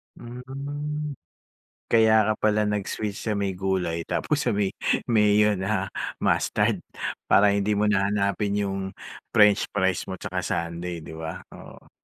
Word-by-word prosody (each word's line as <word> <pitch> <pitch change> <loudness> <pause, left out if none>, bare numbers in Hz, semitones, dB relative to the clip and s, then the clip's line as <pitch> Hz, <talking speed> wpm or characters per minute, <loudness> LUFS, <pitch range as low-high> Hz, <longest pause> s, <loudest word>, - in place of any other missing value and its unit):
Hmm. 145 +5 -5 0.8
Kaya 110 -1 +5
ka - - -3
pala 105 0 +2
nag 105 -1 -1
switch 105 -2 -4
sa 110 -2 -1
may 100 -1 -1
gulay 90 -3 -1
tapos 150 -4 0
sa - - +3
may 100 -2 0 0.3
mayo 105 -2 +4
na 95 0 -1 0.3
mustard - - +1 0.5
para 100 0 +5
hindi 100 +1 +1
mo 105 - +2
na 100 -2 +2
hanapin 100 0 0
yung 100 0 -2 0.5
french 105 -1 +5
fries 95 -2 0
mo 95 - -4
tsaka - - -4
sundae 85 0 -3
di - - -9
ba? 80 0 -6 0.2
Oo. - - -13
105 Hz, 145 wpm, -25 LUFS, 95-110 Hz, 0.8 s, Kaya